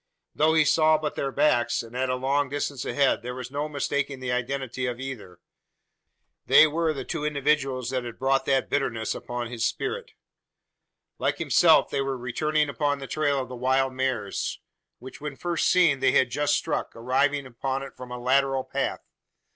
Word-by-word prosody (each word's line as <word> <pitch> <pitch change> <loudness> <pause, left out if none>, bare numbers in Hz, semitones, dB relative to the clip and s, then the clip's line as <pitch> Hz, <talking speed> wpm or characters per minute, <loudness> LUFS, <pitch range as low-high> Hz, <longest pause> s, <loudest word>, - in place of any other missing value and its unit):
Though 160 +1 +3
he 155 -1 +5
saw 155 +1 +4
but 150 -1 -3
their 135 - -2
backs 120 -5 +2
and 115 +1 -12
at 130 +1 0
a 125 - +1
long 135 +2 0
distance 140 -2 -3
ahead 140 -4 +2
there 125 +1 -6
was 130 0 -7
no 145 +2 -2
mistaking 140 -1 -2
the 130 -1 -3
identity 130 0 -2
of 120 -1 -4
either. 110 -10 -7 1.1
They - - +8
were 160 +1 0
the 135 -4 -5
two 165 -3 -4
individuals 140 -4 0
that 130 -2 -1
had 120 -2 -7
brought 135 0 +1
that 135 -1 +2
bitterness 115 -6 -1
upon 120 0 -5
his 120 -2 -3
spirit. - - -2 1.1
Like - - 0
himself - - +4
they 140 - 0
were 135 -1 -2
returning 150 +5 0
upon 145 0 0
the 135 - -7
trail 145 0 0
of 130 - -6
the 125 - -8
wild 130 +1 +1
mares; 130 -6 -2 0.4
which, 130 +3 -11
when 150 -2 -5
first 170 +2 -1
seen, 170 -7 +4
they 135 - +3
had 125 -2 +3
just 145 0 +1
struck, - - -2
arriving 135 +4 +1
upon 130 +2 -3
it 135 - -10
from 125 -1 -10
a 125 - -5
lateral 135 +1 +2
path. - - -3
135 Hz, 185 wpm, -26 LUFS, 125-145 Hz, 1.1 s, They